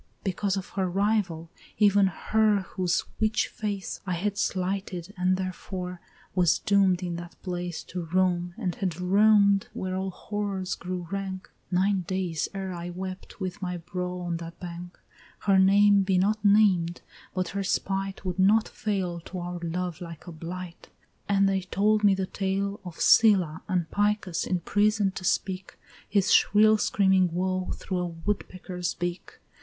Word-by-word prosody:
Because 195 0 -1
of 190 - -5
her 190 -2 -1
rival, 190 -4 0 0.3
even 205 -2 +5
Her 210 +3 +2
whose 185 -1 -1 0.2
witch 215 0 +2
face 205 -3 -4
I 185 - 0
had 200 +4 -1
slighted, 190 -1 -2
and 185 0 +1
therefore 180 -1 -5 0.3
was 175 -3 +3
doom'd 195 -2 +2
in 175 -1 -3
that 175 0 -10
place 175 -2 -4
To 180 -1 -5
roam, 175 0 +1
and 180 -2 -2
had 180 -4 -3
roam'd, 200 +1 +4
where 185 0 -3
all 190 0 -2
horrors 195 -1 -3
grew 180 -1 -5
rank, 195 -1 -4 0.2
Nine 190 +1 +2
days 180 -3 -2
ere 190 -1 -3
I 175 0 -5
wept 185 +2 -7
with 190 +1 -4
my 180 -1 -3
brow 180 +1 -4
on 175 -1 -2
that 165 0 -9
bank; 175 0 -8 0.4
Her 195 -1 +4
name 200 +1 +6
be 190 -1 +1
not 210 +3 +1
named, 195 -5 +4 0.3
but 185 -1 -1
her 200 - -3
spite 195 +1 -2
would 180 0 -3
not 210 +4 +4
fail 190 -6 -2
To 185 - -7
our 175 0 -4
love 175 0 -3
like 165 -3 -8
a 175 - -8
blight; 170 +2 -8 0.4
and 195 -1 +4
they 195 -1 +1
told 210 +3 +1
me 200 -2 +6
the 190 0 -1
tale 195 +1 -2
Of 180 -3 -9
Scylla, 205 -10 +5
and 180 -2 0
Picus, 205 -4 0
imprison'd 205 +3 +1
to 185 - -6
speak 185 0 -1 0.3
His 200 -1 +3
shrill 215 +1 +5
screaming 190 -4 +3
woe 185 +1 -1
through 185 -2 -3
a 180 - -1
woodpecker's 180 0 -4
beak. 175 +1 -5
185 Hz, 160 wpm, -27 LUFS, 180-200 Hz, 0.4 s, name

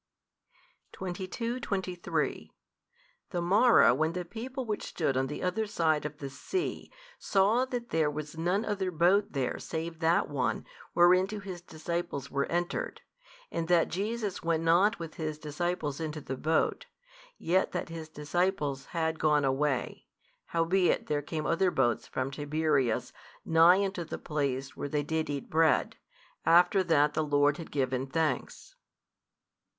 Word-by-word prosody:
22, 190 +7 -4
23 190 -7 -2 0.8
The 180 - -2
morrow, 205 - +5
when 155 +5 0
the 180 0 -4
people 250 +7 -6
which 210 -2 -2
stood 145 -6 -1
on 130 0 +1
the 150 - -5
other 185 +4 0
side 160 -6 +1
of 150 0 -12
the 145 -3 -6
sea 360 - -4 0.3
saw 210 +6 +3
that 245 -2 -5
there 160 -2 +2
was 150 +1 -6
none 180 +6 0
other 200 -3 -1
boat 180 +4 +2
there 135 -3 -1
save 165 0 -5
that 165 +1 +2
one 135 -3 -1 0.3
whereinto 185 +4 +4
His 190 -3 -7
disciples 170 -4 -4
were 140 0 0
entered, 175 - -2 0.5
and 165 -1 -2
that 175 -1 +3
Jesus 210 +2 -2
went 165 -1 0
not 180 +7 +4
with 165 -2 -8
His 155 -2 -3
disciples 155 0 -3
into 155 -1 -4
the 135 -2 -5
boat, 160 - 0 0.5
yet 185 +3 +1
that - - -3
His 165 -1 -7
disciples 150 -2 -1
had 160 -1 0
gone 150 -2 +3
away, 135 0 -1 0.4
howbeit 170 +2 +1
there 145 -1 -1
came 155 +1 -4
other 180 +3 +2
boats 125 -8 +1
from 130 +1 -3
Tiberias 145 -4 0 0.3
nigh 170 +4 +6
unto 190 -3 -3
the - - -6
place 140 -2 -2
where 145 - -4
they 145 0 0
did 160 +1 -2
eat 140 -2 -4
bread, 160 -1 +2 0.5
after 180 +3 +5
that 150 -3 +3
the 155 - 0
Lord 145 0 +2
had 165 - -8
given 130 -1 -1
thanks. 160 - -2
165 Hz, 145 wpm, -30 LUFS, 150-185 Hz, 0.8 s, nigh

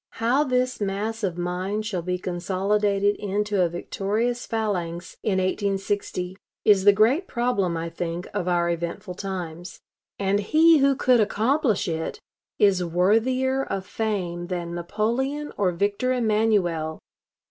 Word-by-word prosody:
How 245 +6 +2
this 255 -3 0
mass 210 +3 -2
of 180 -3 -1
mind 185 +4 -2
shall 195 -5 -2
be 180 +2 -2
consolidated 195 +3 0
into 205 0 -1
a 175 - +3
victorious 215 +7 -2
phalanx 180 -6 -3
in 210 - 0
1860 195 -1 -1 0.3
is 200 -2 +5
the 205 - +9
great 230 - +3
problem, 200 -8 0
I 165 +1 -3
think, 170 +1 -4
of 195 -3 -2
our 175 -1 +2
eventful 170 +2 -4
times. 180 -2 -6 0.4
And 200 0 +1
he 315 +9 +5
who 275 0 +4
could 255 -2 +3
accomplish 225 - +1
it 160 -1 -3 0.4
is 195 -3 +4
worthier 230 +10 +2
of 195 -6 -4
fame 185 -6 -3
than 175 -2 -4
Napoleon 235 - -2
or 190 -3 +1
Victor 200 +8 0
Emmanuel.... 210 -9 +1
200 Hz, 135 wpm, -24 LUFS, 180-225 Hz, 0.4 s, the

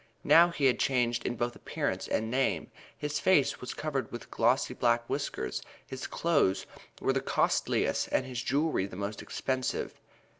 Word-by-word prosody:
Now 170 +1 +7
he 160 -5 -1
had 130 - +4
changed 120 -3 +1
in 120 - -2
both 120 +1 -2
appearance - - -3
and 110 +1 -1
name. 125 -11 0 0.3
His 150 0 -2
face 185 -8 +3
was 125 - -5
covered 140 -6 -3
with 120 - -8
glossy 120 +4 +2
black 120 -1 +1
whiskers, - - -3 0.2
his 130 0 -6
clothes 140 - +1 0.3
were - - +1
the - - 0
costliest - - +1
and 130 - +1
his 125 -2 -4
jewelry 140 -6 +1
the 95 - -10
most 100 +2 -4
expensive. 130 -1 -3
125 Hz, 160 wpm, -30 LUFS, 115-140 Hz, 0.3 s, Now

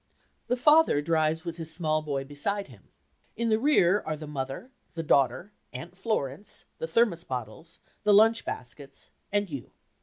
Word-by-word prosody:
The 250 - +1
father 300 - +5
drives 160 +1 0
with 170 -1 -5
his 165 -1 -5
small 155 -3 0
boy 140 -3 -3
beside 150 +7 -3
him; 110 -7 -17 0.5
in 230 +1 -1
the 220 0 +3
rear 210 -8 +4
are 155 - -3
the 155 0 -8
mother, 140 - -5 0.2
the 165 - -3
daughter, 155 +7 +2 0.2
Aunt 165 +8 -8
Florence, 190 - -3
the 160 - -3
thermos 175 -2 +2
bottles, 125 +4 -6 0.2
the 210 - +3
lunch 220 +3 +5
baskets 135 +3 -8 0.2
and 205 0 +1
you. 140 -7 -8
165 Hz, 160 wpm, -28 LUFS, 145-205 Hz, 0.5 s, father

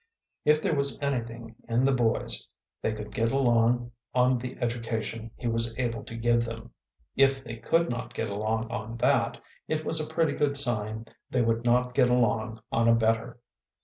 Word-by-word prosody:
If 150 +1 +4
there - - +1
was 140 -4 +1
anything 120 -5 -3 0.2
in 120 +3 +2
the 135 - +4
boys, 120 -3 +1 0.3
they - - 0
could 105 -1 -7
get 115 0 +1
along 120 -2 +2 0.2
on 125 0 +3
the 125 +1 -6
education 115 -1 -3
he - - -10
was 115 0 +1
able 115 -3 -2
to 115 - -8
give 120 0 +2
them. 115 0 -7 0.4
If 135 -1 +3
they 115 -2 -7
could 165 +7 +1
not 120 +1 -5
get 115 - -2
along 110 +2 -2
on 115 0 -5
that, - - +2 0.3
it 155 0 -2
was 160 - +1
a 155 - -3
pretty 160 -2 +1
good 140 -1 +1
sign 110 -4 +2 0.2
they 125 -2 +1
would 115 +1 0
not 125 +1 +2
get 125 -2 +4
along 115 -2 +1
on 115 0 +2
a 115 - +6
better. 115 +1 0
120 Hz, 180 wpm, -27 LUFS, 115-130 Hz, 0.4 s, a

